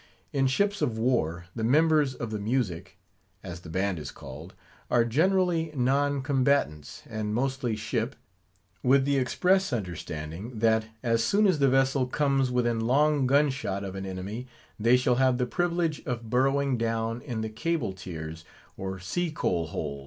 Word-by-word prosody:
In 135 -1 +2
ships 200 +9 +1
of 115 -2 0
war, 90 -8 0
the 115 - -3
members 150 +2 +3
of 115 -2 -5
the 105 - -3
"music," 100 -5 -2 0.5
as 90 -2 -7
the 85 - -12
band 95 +1 -1
is 75 -2 -6
called, 75 +6 -10 0.3
are 120 -1 +3
generally 165 +4 +2
non 140 +2 +1
combatants; 130 - 0
and 110 -1 -3
mostly 130 -2 -1
ship, 115 +4 -2 0.7
with 135 +1 +4
the 140 0 +2
express 185 +8 +2
understanding, 90 0 -5
that 110 0 +2 0.2
as 115 -1 +2
soon 205 - +3
as 185 -6 +3
the 140 -1 +4
vessel 135 0 +2
comes 135 -1 +1
within 120 -2 +1
long 140 +4 +3
gun 140 +2 +4
shot 100 -7 -3
of 95 -1 -5
an 95 0 -5
enemy, 100 +7 -5 0.3
they 120 +4 +5
shall 125 -1 +2
have 130 -1 +3
the 125 - +1
privilege 170 +2 -1
of 115 -3 -4
burrowing 135 0 +2
down 115 +1 -1
in 120 -5 -4
the 110 - -3
cable 115 - -2
tiers, 80 -4 -7 0.3
or 95 0 -5
sea 100 - -2
coal 85 - -1
hole. 70 -2 -4
120 Hz, 165 wpm, -27 LUFS, 100-140 Hz, 0.7 s, they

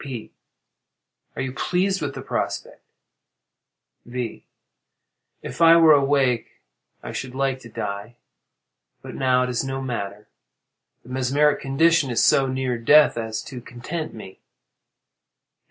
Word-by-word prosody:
P. 130 -6 -7 1.0
Are - - -3
you 130 - -3
pleased 185 +7 0
with 145 - -3
the - - -7
prospect? - - -4 1.2
V. 120 -2 -6 1.0
If - - -7
I 165 0 +8
were 165 -2 +7
awake 135 -4 +1 0.4
I - - -6
should 130 0 -6
like 135 -1 -1
to 115 - -13
die, 105 +2 -5 0.9
but - - -8
now 125 -1 +2
it 125 - -2
is 125 - -1
no 135 0 -4
matter. 105 -5 -5 0.8
The - - -16
mesmeric 135 +3 +1
condition 150 +2 +2
is 120 - +1
so 135 -1 +4
near 130 -2 -2
death 150 +6 +5
as 110 -2 -4
to 130 -3 -9
content 125 +8 -6
me. 95 -4 -11
130 Hz, 130 wpm, -23 LUFS, 120-145 Hz, 1.2 s, I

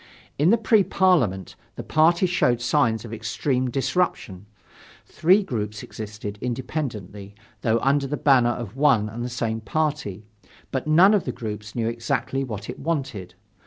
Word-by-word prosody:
In 155 +4 +4
the 230 - +5
Pre 220 -2 +3
Parliament, 165 - +1 0.2
the - - -6
party 170 +4 +3
showed 125 -9 +2
signs 120 -3 +1
of 115 - -8
extreme 125 +3 -1
disruption: 125 - -2 0.6
three 185 +6 +3
groups 105 - -4
existed 105 -1 -7
independently, 115 - -5 0.3
though 115 0 +2
under 140 +1 +2
the 150 +2 -3
banner 130 -4 +4
of 120 -2 -5
one 135 -7 +3
and 115 +3 -6
the 125 - -3
same 115 -2 -2
party, 140 -5 -2 0.5
but 130 +2 -3
none 175 +7 +6
of 205 - +1
the 125 - -2
groups 110 -2 -7
knew 115 -2 -1
exactly 115 +3 -2
what 110 -5 -6
it - - -7
wanted. 135 - -3
120 Hz, 155 wpm, -24 LUFS, 110-150 Hz, 0.6 s, none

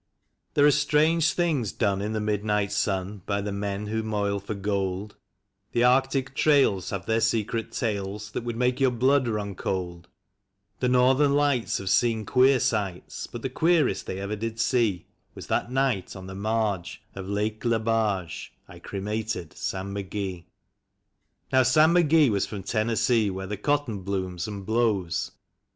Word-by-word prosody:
THERE 145 - +5
are 150 - +7
strange 155 +2 +3
things 150 - 0
done 100 +1 0
in 105 +2 -2
the 110 - -1
midnight 105 -1 0
sun 95 0 -1
By 100 -1 0
the 100 0 -3
men 100 +1 -3
ivho 110 +1 -1
moil 100 -2 -1
for 100 +2 -5
gold; 100 0 -2 0.6
The 120 - +2
Arctic 130 +1 +2
trails 135 - +3
have 100 -1 -4
their 115 0 +1
secret 115 0 0
tales 105 -2 -3
That 115 - -4
would 120 -1 -4
make 125 +1 +1
your 135 -1 +4
Mood 130 +2 +2
run 105 -3 -2
cold; 90 -2 -4 0.7
The 125 - +1
Northern 130 +3 +4
Lights 145 -5 +1
have 95 -1 -3
seen 110 0 +2
queer 130 +1 +4
sights, 100 -6 -2
BiLt 120 - -8
the 130 - -2
queerest 155 - +2
tliey - - -3
ever 100 +2 -3
did 115 +2 -5
see 115 -8 +1 0.3
Was - - -8
that 120 - -1
night 130 -8 0
on 95 -1 -9
the 95 - -8
marge 100 -3 -2
of 95 -1 -7
Lalce 105 +2 -1
Lebarge 110 -6 0 0.2
I - - -13
cremated 105 -3 -4
Sam 95 +1 -4
McGee. 95 -3 -4 1.1
Xow 130 0 +6
Sam 155 +6 +5
McGee 160 -6 +4
was 100 -1 0
from 100 -3 -6
Tennessee, 110 +1 +1
where 95 0 -5
the 105 +2 -4
cotton 135 -1 -1
blooms 95 -3 -3
and 100 -2 -6
blows. 110 -5 0
110 Hz, 160 wpm, -26 LUFS, 100-125 Hz, 1.1 s, are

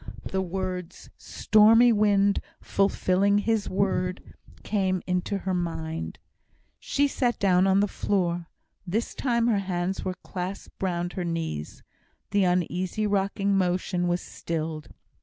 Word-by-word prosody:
The 190 - -1
words 185 -1 -5
"stormy 225 +3 +5
wind 205 -1 +3 0.2
fulfilling 200 0 +2
His 215 0 0
word" 185 -1 -1 0.3
came 190 -3 0
into 180 +2 -1
her 190 -1 -3
mind. 165 -2 -3 0.6
She 285 0 +1
sat 245 -3 0
down 185 -1 +3
on 195 +1 +4
the 205 - +2
floor. 175 -4 -1 0.4
This 220 +6 -1
time 235 -3 0
her 225 -4 +2
hands 185 -1 -2
were 185 - -3
clasped 185 +1 -6
round 175 -2 -1
her 185 - -3
knees. 165 - -4 0.5
The 200 -2 +3
uneasy 180 +3 0
rocking 200 0 +1
motion 180 -1 0
was 175 0 0
stilled. 160 -2 -4
190 Hz, 125 wpm, -26 LUFS, 175-200 Hz, 0.6 s, stormy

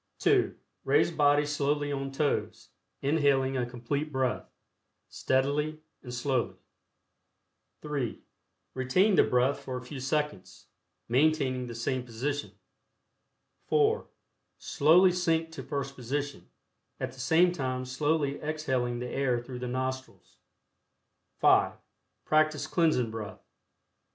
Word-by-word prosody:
(2) - - +2 0.3
Raise 145 +5 +3
body 145 -2 +3
slowly 145 0 0
on 135 -1 -3
toes, 145 +1 -2 0.3
inhaling 140 -2 +2
a 125 -2 -1
Complete 140 +5 -3
Breath, 130 -2 -1 0.6
steadily 145 +4 0 0.2
and 125 - -9
slowly. 125 0 -1 1.3
(3) 145 -6 -3 0.5
Retain 130 +11 +2
the - - +6
breath 125 +3 +2
for 130 -1 -5
a 125 - -7
few 135 +2 -7
seconds, 150 - -3 0.4
maintaining 130 -1 +2
the 120 - -7
same 130 +3 -1
position. 130 +5 -4 1.1
(4) 445 +1 +2 0.5
Slowly 175 +6 +4
sink 165 -2 0
to 160 - -7
first 140 -1 -4
position, 140 +3 -4 0.5
at - - -3
the 130 - -15
same 165 +7 +4
time 130 -6 -3
slowly 145 +2 0
exhaling 130 -6 -1
the 125 +1 -4
air 125 -1 0
through 125 +1 -8
the 125 - -4
nostrils. 130 +1 -5 1.0
(5) - - +4 0.5
Practice 155 -1 +2
Cleansing 155 -8 +1
Breath. 110 -2 -7
140 Hz, 115 wpm, -29 LUFS, 130-155 Hz, 1.3 s, the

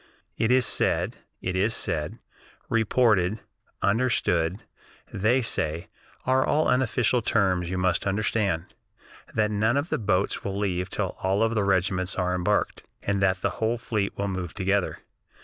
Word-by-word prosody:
It 110 - +1
is 125 0 +4
said - - +1 0.3
(it 90 - -2
is 100 +5 +1
said, 80 -6 -2 0.5
reported, 110 -3 +2 0.4
understood, 100 -4 +1 0.5
they 115 +6 +2
say, 80 -6 -2 0.4
are 130 +1 +2
unofficial 125 -4 +2
terms, 95 -7 +1
you 95 - -2
must 90 +1 +1
understand) 100 -3 0 0.6
that 105 -1 +2
none 110 +5 +2
of 145 +4 -1
the - - 0
boats 100 -2 0
will 100 0 -3
leave 90 -3 -1
till - - -2
all 100 +4 +2
the 110 -2 0
regiments 95 -1 +1
are 90 -1 0
embarked, 90 -1 0 0.2
and 100 0 0
that 95 -1 +2
the - - +1
whole 115 +2 +1
fleet 110 -3 -2
will 100 - -1
move 95 -3 -4
together. 100 -1 0
100 Hz, 145 wpm, -26 LUFS, 90-115 Hz, 0.6 s, is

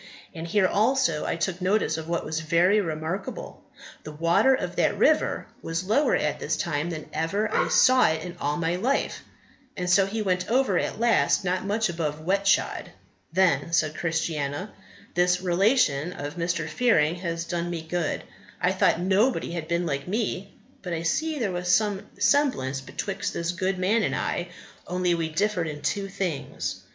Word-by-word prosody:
And 165 -1 -6
here 190 +3 +3
also 215 - +1
I - - 0
took 170 +2 -2
notice 190 -3 +1
of 160 0 -6
what 170 -1 -1
was 160 +1 -2
very 175 +6 +3
remarkable; 170 - -5 0.4
the 155 - -7
water 170 - +3
of - - -4
that - - +2
river - - +2 0.2
was 165 +2 -3
lower 225 +10 +2
at - - -1
this - - -1
time 155 -1 -1
than 155 -3 -6
ever 200 +7 -1
I - - +2
saw 255 0 +5
it 160 0 -2
in 180 -1 -7
all 145 +1 0
my 170 +1 0
life, 255 +9 -1 0.6
so 190 +2 +4
he 215 +2 -2
went 180 -2 -1
over 260 +3 +2
at - - -3
last 230 -4 +3
not 185 +1 -1
much 215 +2 +1
above 160 -3 -3
wet 195 +5 0
shod." - - +1 0.4
Then 165 -4 +2
said 155 -2 +2
Christiana, 160 +2 -2 0.4
"This 180 0 +2
relation 180 - +2
of 145 -2 -6
Mr. 170 -2 -1
Fearing 165 -3 +2
has 170 -1 -3
done 175 0 -2
me 170 -2 -4
good. 165 0 -2 0.4
I - - +2
thought - - +2
nobody 195 +5 +1
had 165 -2 -4
been 170 +1 0
like 140 -2 -3
me, 200 -1 -2 0.3
but 180 -3 -5
I 165 0 -3
see 310 - 0
there 225 -8 -1
was 180 0 -3
some 205 0 +1
semblance 205 - +2
betwixt 195 +9 -4
this 170 +1 -1
good 185 +2 -1
man 200 +5 +2
and - - 0
I, 175 - -2 0.4
only 180 0 +1
we 165 -1 -1
differed 180 +1 0
in 150 -1 -7
two 200 -1 -1
things. 190 -7 -4
180 Hz, 175 wpm, -26 LUFS, 165-200 Hz, 0.6 s, saw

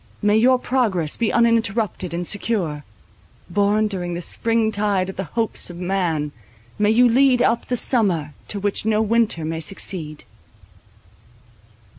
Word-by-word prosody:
May 205 0 +3
your 250 +4 +4
progress 215 - 0
be 230 - 0
uninterrupted 225 -6 +1
and 175 +1 -3
secure; 180 -8 -1 0.7
born 205 +3 +2
during 175 -4 -4
the 175 - -4
spring 225 +4 +1
tide 200 -3 0
of - - -17
the 190 - -4
hopes 225 -4 -1
of 175 - -9
man, 175 -5 -1 0.5
may 210 0 +3
you 240 +3 +5
lead 255 +1 +4
up 235 -1 +1
the 245 - -1
summer 180 - 0
to 205 - -3
which 200 0 -1
no 215 0 +1
winter 220 -6 +1
may 160 +1 -3
succeed! 160 -2 -4
205 Hz, 145 wpm, -21 LUFS, 175-230 Hz, 0.7 s, you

